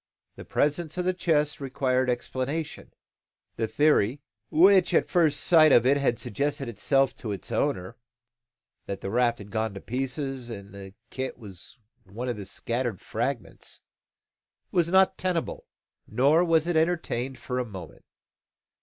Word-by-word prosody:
The - - -10
presence 150 +3 0
of 180 - -1
the 185 - +2
chest 150 -4 0
required 130 -1 0
explanation. 130 +5 -3 0.7
The 115 - 0
theory, 145 -3 +2 0.3
which 185 +2 +5
at - - +3
first 160 -5 +2
sight 155 -3 +6
of 120 -2 +6
it 135 +2 +5
had 135 -4 +1
suggested 140 +5 -2
itself 135 +4 +1
to 110 - -5
its 100 -3 -5
owner 90 +1 -1 0.9
(that 100 -1 -5
the 95 - -4
raft 120 0 +2
had 100 -2 -11
gone 110 -2 -2
to - - -6
pieces 130 +2 -4
and 100 -3 -9
that - - -10
the 95 -1 -10 0.2
kit 130 0 -4
was 100 -1 -11 0.3
one 115 +7 -6
of 120 - -2
the 100 -2 -7
scattered 120 0 -3
fragments) 120 +1 -4 0.9
was 170 -2 +2
not 190 +1 +4
tenable, 180 -3 -2 0.4
nor 145 +7 +3
was 165 -2 +3
it 175 -1 -1
entertained 160 -6 0
for 125 -1 -4
a - - 0
moment. 95 -8 -10
130 Hz, 155 wpm, -26 LUFS, 115-155 Hz, 0.9 s, sight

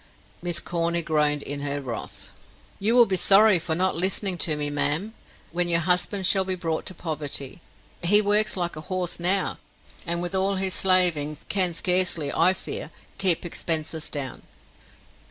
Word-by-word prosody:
Miss 175 -1 0
Corny 170 0 -1
groaned 150 -2 0
in 145 0 -4
her 145 0 -2
wrath. 125 -5 -7 0.5
"You 220 +4 +1
will 240 -1 +7
be 195 - -1
sorry 195 +1 +6
for 160 -1 -2
not 185 +2 +1
listening 190 +2 +1
to 155 -2 +2
me, 145 0 -3
ma'am, 145 +9 -2 0.4
when 175 +1 -1
your 170 0 +2
husband 180 +3 0
shall 190 +1 +4
be 190 0 -3
brought 165 -3 -4
to 185 - -5
poverty. 150 -3 -4 0.4
He 205 +5 +5
works 210 0 +1
like 175 -2 -3
a 155 - -8
horse 185 -2 -2
now, 185 +3 +1 0.5
and 170 0 -1
with 175 +2 -4
all 195 +1 +1
his 190 -1 -1
slaving, 175 -6 +3
can 185 -4 0
scarcely, 180 -5 +2
I 185 - +3
fear, - - -7 0.3
keep 185 -3 +1
expenses 160 -2 -1
down." 140 -3 -4
175 Hz, 165 wpm, -24 LUFS, 155-190 Hz, 0.5 s, will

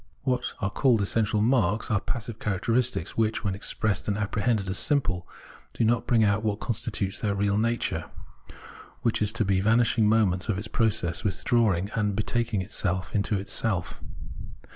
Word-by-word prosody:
What 125 -2 -1
are 100 -1 -1
called 125 -3 +3
essential 105 +1 +1
marks, 110 -3 +2
are 110 - +3
passive 115 -2 -5
characteristics, 115 +5 0
which, 110 0 0
when 100 -3 0
expressed 100 +1 -2
and 100 -1 0
apprehended 105 0 0
as 95 +1 0
simple, 100 - +1 0.5
do - - -1
not 115 +1 +1
bring 115 -3 +4
out 100 0 +2
what 105 -1 -1
constitutes 105 -4 -2
their 100 -2 -1
real 100 0 +1
nature 115 +2 -1 0.5
— - - -17
which 115 -2 +1
is 105 -1 +2
to 115 -2 0
be 95 -1 +2
vanishing 115 0 +3
moments 105 -3 +2
of 100 - +1
its 105 +3 -5
process 110 -7 0
of - - -11
withdrawing 100 -2 +1
and 105 -3 0
betaking 110 -1 -1
itself 95 -2 -2
into 105 0 +1
itself. 95 -2 -1
105 Hz, 165 wpm, -26 LUFS, 100-115 Hz, 0.5 s, bring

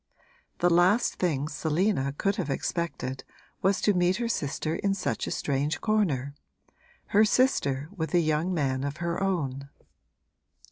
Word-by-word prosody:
The 175 - +3
last 180 +7 +3
thing 150 -6 0
Selina 155 -1 0
could 200 +1 0
have 185 -6 -2
expected 135 -3 -3 0.4
was 195 +1 +2
to 205 - +3
meet 180 0 +2
her 235 +2 -2
sister 155 -5 -2
in 200 -1 0
such 185 - -2
a - - -2
strange 145 +2 -1
corner 160 - 0 0.8
her 210 +1 +5
sister 150 - +2
with 160 -1 -2
a - - +6
young 155 +2 +1
man 135 -6 0
of 140 +1 -3
her 170 +1 -2
own! 140 -8 -2
170 Hz, 145 wpm, -27 LUFS, 140-195 Hz, 0.8 s, a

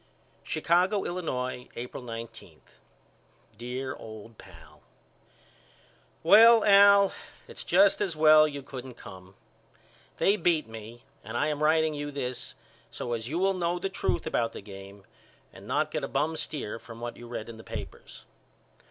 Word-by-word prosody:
Chicago, 175 - +1
Illinois, 130 -8 -4
April 125 +2 -7
19. 115 -1 -9 0.9
DEAR 125 +2 -5
OLD 110 0 -11
PAL: - - -16 1.4
Well 225 +6 +7
Al 200 -1 +6 0.3
it's - - -9
just 195 +4 +4
as 190 -5 -1
well 155 0 +6
you 140 -2 -7
couldn't 130 -2 -9
come. 95 -3 -13 0.8
They 200 +2 +3
beat 165 - +1
me 115 +2 -11 0.2
and 110 +3 -5
I 150 - +1
am 150 -1 -3
writing 160 0 +3
you 145 0 -4
this 130 -3 -5 0.3
so 120 - -5
as 115 0 -4
you 160 - -2
will 195 +2 +2
know 175 -1 -1
the 185 +2 -3
truth 190 - -2
about 115 -7 -1
the - - -8
game 100 0 -12 0.5
and - - -13
not - - 0
get - - -3
a - - -1
bum 150 +4 -1
steer 140 -8 -5
from 115 0 -12
what 120 0 -6
you 120 - -11
read 120 -2 -6
in 115 -1 -10
the 110 - -12
papers. - - -9
140 Hz, 150 wpm, -28 LUFS, 115-170 Hz, 1.4 s, Well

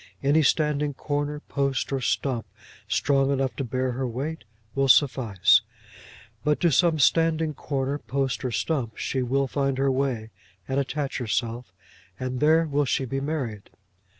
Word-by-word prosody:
Any 145 +3 +4
standing 150 0 +1
corner, 145 +1 -2
post, 140 -2 -1
or 135 - -1
stump, 125 -1 -1 0.4
strong 135 -1 +2
enough 135 -2 0
to 140 - -1
bear 130 +1 -1
her 130 +1 -2
weight 140 +7 -4 0.3
will 135 0 +1
suffice; 125 -8 +4 0.8
but 150 0 +1
to 170 - +4
some 165 +3 +3
standing 160 +3 +3
corner, 140 0 -2
post, 135 -2 -2
or 130 - -1
stump, 115 +1 -2
she 130 - -1
will 135 +2 +1
find 135 0 -1
her 135 0 +2
way 130 -5 -1 0.4
and 135 +1 0
attach 140 0 -2
herself, 115 -1 -2 0.5
and 130 0 -3
there 160 +3 +4
will 145 -1 +1
she 135 +1 0
be 135 +2 -3
married. 135 -9 -4
135 Hz, 150 wpm, -25 LUFS, 130-145 Hz, 0.8 s, Any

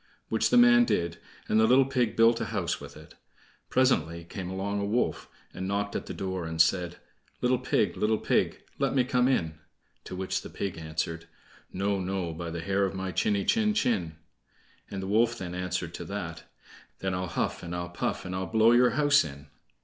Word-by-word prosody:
Which - - +2
the - - +4
man 240 0 +7
did, 85 - -1 0.3
and 110 - +3
the 110 - +5
little 130 +3 +6
pig 125 -5 0
built 115 +1 +4
a - - 0
house - - -2
with - - -10
it. - - -14 0.6
Presently 85 -10 +2
came 90 +1 -6
along 100 +2 -2
a - - -1
wolf, 115 +5 -1 0.2
and 95 +1 -4
knocked 100 +1 -2
at - - -3
the - - -5
door, 95 -2 -3
and 80 0 -5
said: 90 +1 +2 0.4
"Little 125 0 +2
pig, 105 -7 +1
little 110 +1 +1
pig, - - 0 0.2
let - - +1
me 130 - +4
come 125 0 +2
in." 80 - 0 0.5
To - - -6
which 95 0 -2
the - - -9
pig 100 -3 -4
answered: 80 +1 -4 0.4
"No, 100 +1 -1
no, 90 -2 -2
by 85 +1 -5
the 85 0 -4
hair 100 +3 +1
of 95 0 -1
my 95 0 -3
chiny 100 +1 +1
chin 215 -2 +2
chin." 100 - 0 0.7
The 95 -1 -5
wolf 115 +4 +2
then 90 -2 -6
answered 90 -1 -3
to - - -6
that: - - -6 0.5
"Then 95 -1 -2
I'll 90 0 -2
huff, - - -2
and 85 0 -5
I'll 85 0 -4
puff, 85 - -3
and 90 - -5
I'll 95 0 -2
blow 110 +1 +4
your 120 +1 +6
house 145 -1 +5
in." 70 -1 -10
95 Hz, 200 wpm, -28 LUFS, 85-115 Hz, 0.7 s, man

